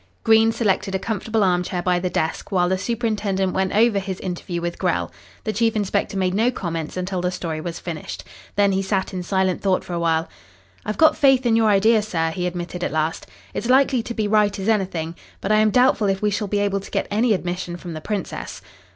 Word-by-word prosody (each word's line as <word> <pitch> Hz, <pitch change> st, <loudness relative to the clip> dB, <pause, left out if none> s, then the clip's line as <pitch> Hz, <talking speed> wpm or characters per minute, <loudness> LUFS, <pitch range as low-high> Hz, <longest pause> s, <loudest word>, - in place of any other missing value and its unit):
Green 225 Hz, 0 st, +5 dB
selected 200 Hz, -4 st, 0 dB
a -, -, +3 dB
comfortable 220 Hz, +1 st, -1 dB
arm 180 Hz, -2 st, +3 dB
chair 180 Hz, 0 st, -3 dB
by 180 Hz, 0 st, +2 dB
the 180 Hz, 0 st, -1 dB
desk, 160 Hz, +2 st, -2 dB
while 180 Hz, -2 st, +2 dB
the 190 Hz, -, +1 dB
superintendent 205 Hz, -4 st, -1 dB
went 190 Hz, 0 st, 0 dB
over 215 Hz, -1 st, +4 dB
his 190 Hz, -1 st, -5 dB
interview 175 Hz, -1 st, -4 dB
with 170 Hz, 0 st, -4 dB
Grell. -, -, 0 dB, 0.3 s
The 215 Hz, -, -2 dB
chief 225 Hz, +1 st, +1 dB
inspector 200 Hz, -1 st, -1 dB
made 185 Hz, -1 st, +1 dB
no 225 Hz, +5 st, +3 dB
comments 165 Hz, -8 st, -4 dB
until 185 Hz, 0 st, -2 dB
the 180 Hz, -, 0 dB
story 165 Hz, -3 st, -4 dB
was 170 Hz, 0 st, -5 dB
finished. 165 Hz, -3 st, -6 dB, 0.3 s
Then 200 Hz, -1 st, +3 dB
he 190 Hz, 0 st, +1 dB
sat 190 Hz, -1 st, -1 dB
in 185 Hz, -, -3 dB
silent 190 Hz, 0 st, 0 dB
thought 190 Hz, -2 st, +1 dB
for 180 Hz, -, -7 dB
a 170 Hz, -, -1 dB
while. 165 Hz, -1 st, +1 dB, 0.6 s
"I've 215 Hz, -, -2 dB
got 315 Hz, -1 st, +5 dB
faith 270 Hz, -2 st, +4 dB
in 230 Hz, -2 st, +3 dB
your 225 Hz, -1 st, +4 dB
idea, 215 Hz, +2 st, +4 dB
sir," 165 Hz, -6 st, -1 dB
he 180 Hz, +2 st, -2 dB
admitted 175 Hz, 0 st, -5 dB
at -, -, -1 dB
last. 155 Hz, +1 st, -1 dB, 0.3 s
"It's 235 Hz, -, -3 dB
likely 260 Hz, -1 st, +4 dB
to 235 Hz, +1 st, -6 dB
be 215 Hz, -2 st, 0 dB
right 210 Hz, -1 st, +2 dB
as 195 Hz, +1 st, -4 dB
anything. 185 Hz, -7 st, 0 dB, 0.3 s
But 195 Hz, -, -2 dB
I 215 Hz, -, +5 dB
am 215 Hz, 0 st, +4 dB
doubtful 250 Hz, -2 st, +3 dB
if 195 Hz, 0 st, 0 dB
we 210 Hz, 0 st, +1 dB
shall 205 Hz, +1 st, -1 dB
be 205 Hz, -, -1 dB
able 200 Hz, -1 st, 0 dB
to 195 Hz, -, -11 dB
get -, -, -1 dB
any 220 Hz, +1 st, +3 dB
admission 175 Hz, -1 st, -4 dB
from 175 Hz, -1 st, -8 dB
the 155 Hz, -, -6 dB
Princess." 205 Hz, +2 st, -5 dB
195 Hz, 230 wpm, -22 LUFS, 180-215 Hz, 0.6 s, Green